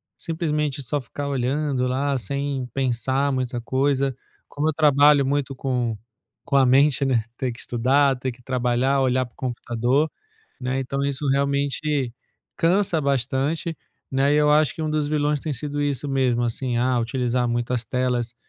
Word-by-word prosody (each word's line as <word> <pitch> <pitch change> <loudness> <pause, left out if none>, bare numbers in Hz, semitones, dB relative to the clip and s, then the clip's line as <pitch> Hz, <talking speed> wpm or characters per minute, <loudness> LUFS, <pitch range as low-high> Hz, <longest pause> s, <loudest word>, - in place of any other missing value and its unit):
simplesmente 150 -4 -2
só 140 +3 -1
ficar 140 +4 -6
olhando 135 0 0
lá 135 +2 0
sem 140 0 -3
pensar 135 +2 0
muita 125 -2 -2
coisa. 135 +1 0 0.3
Como 150 +2 -1
eu - - 0
trabalho 145 -1 +5
muito 140 0 -1
com 125 -4 -1 0.5
com 140 - -1
a 135 -1 +6
mente, 140 +2 +4
né, 120 -4 +2
tem 130 -2 -1
que 115 - -10
estudar, 135 +3 +2
tem 125 0 -3
que 125 +1 -16
trabalhar, 125 +2 +1
olhar 130 0 +2
para 120 - -18
o - - -37
computador, 125 +4 0 0.5
né, 130 +1 -1
então 135 +1 -3
isso 140 +1 -2
realmente 140 -1 0 0.4
cansa 175 -1 +2
bastante, 140 +4 -1 0.3
né, 135 +2 +2
e - - +3
eu 150 0 +4
acho 150 -3 +3
que 160 - -5
um 155 - -1
dos 150 -1 0
vilões 150 -1 +1
tem 155 - -4
sido 145 +2 -3
isso 145 -1 -1
mesmo, 130 -3 +1
assim, 120 +1 -2
ah, 125 +1 +2
utilizar 125 0 0
muito 120 +1 -1
as 120 -1 -1
telas 125 -1 -1
135 Hz, 170 wpm, -23 LUFS, 125-145 Hz, 0.5 s, a